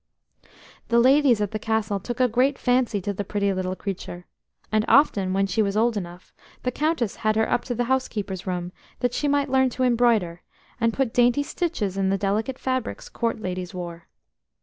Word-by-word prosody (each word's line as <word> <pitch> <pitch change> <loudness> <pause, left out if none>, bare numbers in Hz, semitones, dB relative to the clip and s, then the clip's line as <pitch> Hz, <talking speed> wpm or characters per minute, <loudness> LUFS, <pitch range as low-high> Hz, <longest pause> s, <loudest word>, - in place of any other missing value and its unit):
The 235 - +2
ladies 260 -2 +5
at 205 - -1
the 215 - -3
Castle 220 -2 -1
took 240 +6 -6
a 255 - +5
great 255 +4 +2
fancy 245 -4 +1
to 200 +2 -2
the 205 - -3
pretty 200 0 0
little 185 0 -2
creature, 180 -2 -6 0.5
and 215 0 +2
often, 205 -10 +4
when 195 +1 +2
she 195 +3 0
was 200 0 0
old 230 +1 +2
enough, 180 -2 -7 0.3
the 250 - 0
Countess 295 - -1
had 215 -1 +1
her 220 0 +2
up 240 - 0
to 245 - -3
the 245 - 0
housekeeper's 215 -7 -2
room 180 -1 -3 0.3
that 245 -1 +1
she 295 - -1
might 285 -1 +1
learn 265 -1 +4
to 255 +1 -3
embroider, 230 -8 +2 0.4
and 230 -1 +2
put 255 -1 -1
dainty 245 +3 +3
stitches 275 - -2
in 190 -1 +1
the 195 - +1
delicate 210 +6 -1
fabrics 260 -2 -3
Court 230 -1 -2
ladies 185 -2 -4
wore. 170 -2 -7
220 Hz, 195 wpm, -24 LUFS, 195-250 Hz, 0.5 s, ladies